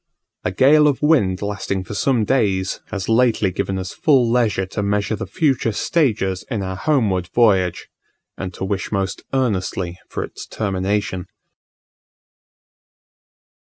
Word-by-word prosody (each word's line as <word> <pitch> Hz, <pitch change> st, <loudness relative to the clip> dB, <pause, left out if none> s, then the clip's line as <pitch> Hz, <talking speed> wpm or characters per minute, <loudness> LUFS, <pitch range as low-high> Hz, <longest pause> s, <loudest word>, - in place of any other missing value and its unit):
A 90 Hz, -, -1 dB
gale 150 Hz, +9 st, +5 dB
of 145 Hz, 0 st, 0 dB
wind 105 Hz, -, +3 dB
lasting 100 Hz, -2 st, -2 dB
for 95 Hz, -, -8 dB
some 120 Hz, 0 st, +1 dB
days, 100 Hz, -7 st, +1 dB
has 100 Hz, -2 st, -4 dB
lately 115 Hz, -4 st, +3 dB
given 95 Hz, +1 st, -2 dB
us 95 Hz, -1 st, -5 dB
full 135 Hz, -6 st, +3 dB
leisure 110 Hz, -6 st, +2 dB
to 100 Hz, +2 st, -4 dB
measure 105 Hz, +1 st, 0 dB
the 100 Hz, -, -6 dB
future 130 Hz, -, +1 dB
stages 105 Hz, -, 0 dB
in 110 Hz, -6 st, -2 dB
our 95 Hz, 0 st, -4 dB
homeward 100 Hz, -, +1 dB
voyage, 95 Hz, -7 st, +3 dB, 0.5 s
and 95 Hz, -, -5 dB
to 95 Hz, -, -4 dB
wish 100 Hz, 0 st, -3 dB
most 95 Hz, -2 st, -2 dB
earnestly 95 Hz, -8 st, -1 dB
for -, -, -3 dB
its -, -, -9 dB
termination. 95 Hz, -2 st, -2 dB
100 Hz, 135 wpm, -20 LUFS, 95-120 Hz, 0.5 s, gale